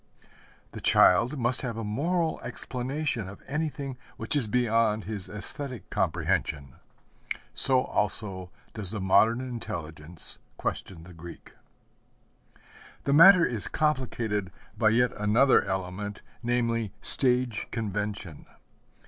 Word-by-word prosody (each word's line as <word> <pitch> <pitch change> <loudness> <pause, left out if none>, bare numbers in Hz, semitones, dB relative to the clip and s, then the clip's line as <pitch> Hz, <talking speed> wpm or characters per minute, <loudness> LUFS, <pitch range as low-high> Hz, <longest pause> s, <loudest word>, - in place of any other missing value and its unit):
The - - -9
child 115 +10 +4
must 120 0 0
have 120 -4 -4
a 115 - -4
moral 160 +10 -1
explanation 125 -2 -3
of 100 - -13
anything 140 -3 -4 0.2
which 110 +5 -3
is 135 -6 +1
beyond 115 -2 +1
his 105 -3 -5
æsthetic 120 +2 -5
comprehension. 70 -4 -1 0.8
So 130 -1 +4
also 95 -3 -3 0.2
does 105 -4 0
the 110 - -1
modern 110 +5 +3
intelligence 85 -10 -6 0.2
question 85 -4 -5
the 90 +1 -13
Greek. 85 +1 -12 1.5
The 140 - +1
matter 170 +3 +8
is 115 -5 +2
complicated 120 - -1 0.2
by 110 -2 +3
yet 120 +2 +2
another 110 +6 +3
element, 95 +2 -5 0.2
namely 115 -3 -1
stage 125 -4 +4
convention. 105 -6 -5
115 Hz, 110 wpm, -27 LUFS, 100-130 Hz, 1.5 s, matter